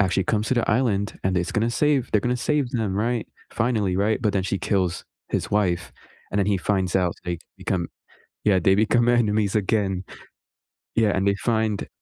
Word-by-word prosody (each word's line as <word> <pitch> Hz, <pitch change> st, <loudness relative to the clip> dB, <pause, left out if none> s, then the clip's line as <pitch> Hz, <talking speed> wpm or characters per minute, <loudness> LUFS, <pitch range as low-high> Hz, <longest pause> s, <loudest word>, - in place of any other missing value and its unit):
actually 95 Hz, -1 st, +2 dB
comes 105 Hz, +2 st, 0 dB
to -, -, +2 dB
the 120 Hz, -4 st, +1 dB
island, 105 Hz, -4 st, 0 dB
and 95 Hz, 0 st, +1 dB
is 90 Hz, -, -2 dB
gonna 115 Hz, +1 st, +1 dB
save 145 Hz, 0 st, +1 dB
they're 105 Hz, -, +4 dB
gonna 125 Hz, +3 st, 0 dB
save 140 Hz, 0 st, 0 dB
them, 110 Hz, -6 st, -1 dB
right? 115 Hz, +3 st, -1 dB, 0.3 s
Finally, 110 Hz, -6 st, 0 dB
right? 105 Hz, +5 st, +1 dB
But 105 Hz, -3 st, +2 dB
then 95 Hz, -2 st, +1 dB
she 95 Hz, +1 st, -1 dB
kills 95 Hz, -4 st, -1 dB, 0.2 s
his -, -, -2 dB
wife, 90 Hz, -4 st, 0 dB, 0.4 s
and 100 Hz, -, -1 dB
then 100 Hz, -, +2 dB
he 100 Hz, -1 st, +2 dB
finds 95 Hz, -2 st, 0 dB
out 90 Hz, -2 st, +1 dB
so -, -, -23 dB
they 85 Hz, -1 st, -2 dB, 0.2 s
become 90 Hz, -3 st, -2 dB, 0.6 s
Yeah, 100 Hz, -3 st, +4 dB
they 95 Hz, +2 st, +4 dB
become 110 Hz, +3 st, +3 dB
enemies 110 Hz, -4 st, +2 dB
again. 100 Hz, -2 st, 0 dB, 0.9 s
Yeah, 110 Hz, -2 st, +3 dB
and 95 Hz, +1 st, +1 dB
they 100 Hz, -, +3 dB
find 110 Hz, -1 st, -1 dB
105 Hz, 195 wpm, -24 LUFS, 95-115 Hz, 0.9 s, they're